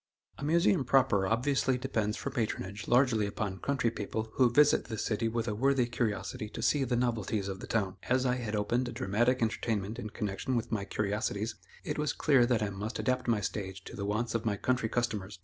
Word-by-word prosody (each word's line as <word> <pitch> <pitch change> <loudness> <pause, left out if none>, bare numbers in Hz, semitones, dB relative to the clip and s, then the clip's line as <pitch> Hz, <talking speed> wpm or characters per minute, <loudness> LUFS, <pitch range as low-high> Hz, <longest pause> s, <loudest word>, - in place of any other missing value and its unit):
A - - -6
Museum 170 +1 +3
proper 125 -6 +3
obviously 130 +3 +1
depends 110 -5 -1
for 140 - -4
patronage 105 -5 -3
largely 120 -4 +3
upon 100 -2 -3
country 125 -2 0
people 110 0 -4
who 125 -2 +4
visit 145 +5 +4
the 110 - -5
city 115 +2 0
with 115 0 -2
a 105 - 0
worthy 135 +3 +2
curiosity 110 -3 -2
to - - -6
see 145 -2 +3
the 125 -1 0
novelties 110 -4 0
of 95 -1 -4
the - - -8
town. 95 -4 -1
As 125 +1 +3
I 125 0 +2
had 110 -3 -3
opened 120 +5 0
a - - -7
dramatic 120 +6 +1
entertainment 110 -1 -1
in 110 - -5
connection 105 +4 -3
with 120 0 -2
my 105 -3 -1
curiosities, 105 +2 -1 0.3
it - - -3
was 150 -1 0
clear 135 -5 +4
that 120 -3 +2
I 100 - -2
must 100 +4 -4
adapt 130 -1 0
my 110 -3 +2
stage 95 -1 -4
to - - -9
the 100 - -4
wants 110 +3 -1
of 115 -1 -1
my 105 -3 0
country 125 0 0
customers. 105 -5 -2
115 Hz, 210 wpm, -31 LUFS, 105-125 Hz, 0.3 s, who